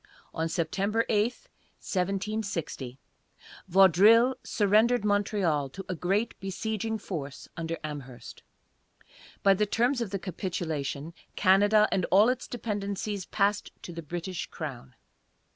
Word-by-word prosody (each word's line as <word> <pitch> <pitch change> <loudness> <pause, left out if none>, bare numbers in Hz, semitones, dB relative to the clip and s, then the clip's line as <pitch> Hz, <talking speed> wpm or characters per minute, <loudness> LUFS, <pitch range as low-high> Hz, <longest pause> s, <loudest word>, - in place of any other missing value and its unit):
On 165 0 -1
September 195 +7 0
8, 210 -1 +3 0.5
1760, 195 - -3 0.7
Vaudreuil 195 +7 +6
surrendered 215 +2 +3
Montreal 200 -8 +1
to 195 +8 -8
a 185 - -2
great 195 +6 0
besieging 220 +3 -3
force 150 -9 -6
under 165 0 -3
Amherst. 140 -5 -8 1.0
By 195 - +6
the 210 +2 +1
terms 245 +4 +1
of 230 - -2
the 195 - -2
capitulation, 165 -5 -4 0.2
Canada 205 +2 +5
and 185 -3 +1
all 205 +5 +5
its 255 0 -2
dependencies 205 -3 -3
passed 205 0 0
to 175 - -7
the 165 - -6
British 175 +3 -5
crown. 135 - -7
195 Hz, 115 wpm, -28 LUFS, 165-210 Hz, 1.0 s, Vaudreuil